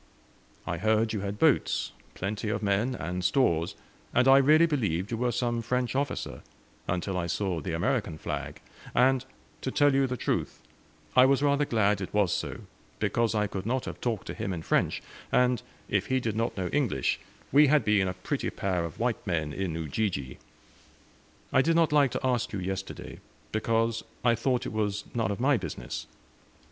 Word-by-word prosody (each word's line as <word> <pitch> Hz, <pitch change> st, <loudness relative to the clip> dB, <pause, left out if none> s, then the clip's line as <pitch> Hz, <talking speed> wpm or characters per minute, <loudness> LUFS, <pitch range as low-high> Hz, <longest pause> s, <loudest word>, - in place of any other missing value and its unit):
I -, -, -2 dB
heard 110 Hz, +2 st, +2 dB
you 105 Hz, -, -1 dB
had 100 Hz, +1 st, -4 dB
boats, 155 Hz, +2 st, +2 dB, 0.2 s
plenty 105 Hz, +3 st, -3 dB
of 110 Hz, -, -2 dB
men, 105 Hz, +6 st, +1 dB
and 90 Hz, -2 st, -4 dB
stores, 90 Hz, -, +2 dB, 0.4 s
and 125 Hz, +1 st, +4 dB
I 135 Hz, +1 st, +8 dB
really 155 Hz, +4 st, +6 dB
believed 105 Hz, -, -1 dB
you 115 Hz, -, -1 dB
were 125 Hz, +1 st, +1 dB
some 120 Hz, -1 st, -1 dB
French 125 Hz, +1 st, -1 dB
officer, 140 Hz, 0 st, -2 dB, 0.5 s
until 90 Hz, +2 st, -1 dB
I 85 Hz, -, -2 dB
saw 90 Hz, -2 st, -1 dB
the 90 Hz, -, -4 dB
American 95 Hz, -, 0 dB
flag; -, -, -5 dB, 0.3 s
and, 130 Hz, +1 st, +4 dB, 0.4 s
to -, -, -2 dB
tell 145 Hz, +1 st, +3 dB
you 135 Hz, 0 st, +3 dB
the 125 Hz, 0 st, -3 dB
truth, -, -, -2 dB, 0.6 s
I 130 Hz, 0 st, +8 dB
was 140 Hz, +1 st, +3 dB
rather 145 Hz, 0 st, +3 dB
glad 105 Hz, -5 st, +2 dB
it 95 Hz, -, -5 dB
was 100 Hz, -4 st, +3 dB
so, -, -, -3 dB, 0.4 s
because 115 Hz, -2 st, +1 dB
I 105 Hz, -1 st, +2 dB
could 95 Hz, 0 st, -5 dB
not 130 Hz, +2 st, 0 dB
have -, -, -7 dB
talked 115 Hz, -5 st, -2 dB
to -, -, -5 dB
him 95 Hz, -, -3 dB
in 85 Hz, -2 st, -5 dB
French; -, -, +1 dB, 0.3 s
and 125 Hz, -2 st, +3 dB, 0.3 s
if -, -, 0 dB
he 130 Hz, 0 st, +2 dB
did 115 Hz, -4 st, -2 dB
not 115 Hz, -1 st, -1 dB
know 90 Hz, -2 st, -1 dB
English, 125 Hz, -, 0 dB, 0.3 s
we 145 Hz, +2 st, +7 dB
had 145 Hz, -4 st, +3 dB
been 105 Hz, -3 st, +3 dB
a 90 Hz, -, -3 dB
pretty 90 Hz, -, -2 dB
pair 90 Hz, -3 st, -1 dB
of 85 Hz, -, -6 dB
white 115 Hz, -2 st, -1 dB
men 80 Hz, -5 st, -1 dB
in 95 Hz, -2 st, -2 dB
Ujiji! 80 Hz, -4 st, -2 dB, 1.1 s
I 130 Hz, -, +6 dB
did 165 Hz, +4 st, +2 dB
not 165 Hz, -2 st, +3 dB
like 145 Hz, -2 st, +5 dB
to -, -, -2 dB
ask 125 Hz, -3 st, +1 dB
you 100 Hz, -, -2 dB
yesterday, 95 Hz, +1 st, -5 dB, 0.3 s
because 115 Hz, +1 st, 0 dB, 0.2 s
I 120 Hz, -, +5 dB
thought 125 Hz, +2 st, 0 dB
it -, -, -4 dB
was 105 Hz, -2 st, -1 dB
none 115 Hz, -5 st, 0 dB
of 100 Hz, -, -3 dB
my 135 Hz, +2 st, +3 dB
business." 80 Hz, -, -6 dB
110 Hz, 185 wpm, -28 LUFS, 95-130 Hz, 1.1 s, I